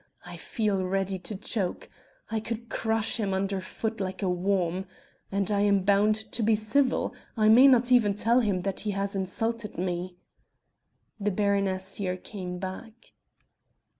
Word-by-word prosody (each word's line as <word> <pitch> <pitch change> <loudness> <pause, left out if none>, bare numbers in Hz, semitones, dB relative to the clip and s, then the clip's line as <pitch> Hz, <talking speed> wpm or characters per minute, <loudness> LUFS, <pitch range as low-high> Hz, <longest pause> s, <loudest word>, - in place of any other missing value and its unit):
I - - -8
feel 210 -5 -1
ready 190 0 -1
to 205 +4 -5
choke... 195 -1 -2 0.4
I 225 - 0
could 230 +1 -5
crush 225 0 0
him 195 -3 0
under 195 0 -1
foot 220 +4 -4
like 185 +1 -4
a 190 - +1
worm!... 180 0 0 0.4
and 200 +1 0
I 205 - +2
am 200 -2 +3
bound 205 +2 +4 0.2
to 235 - -1
be 220 0 +4
civil. 235 +5 +1 0.2
I 215 -1 +4
may 245 +5 +8
not 250 -2 +4
even 215 -5 +4
tell 230 +4 +3
him 200 -6 +1
that 195 0 -3
he 215 - -2
has 200 0 -2
insulted 220 +3 -3
me." 180 0 -3 1.0
The 210 0 0
baroness 195 -1 0
here 185 -2 -2
came 180 -1 -6
back. 195 +5 -8
200 Hz, 160 wpm, -27 LUFS, 190-220 Hz, 1.0 s, may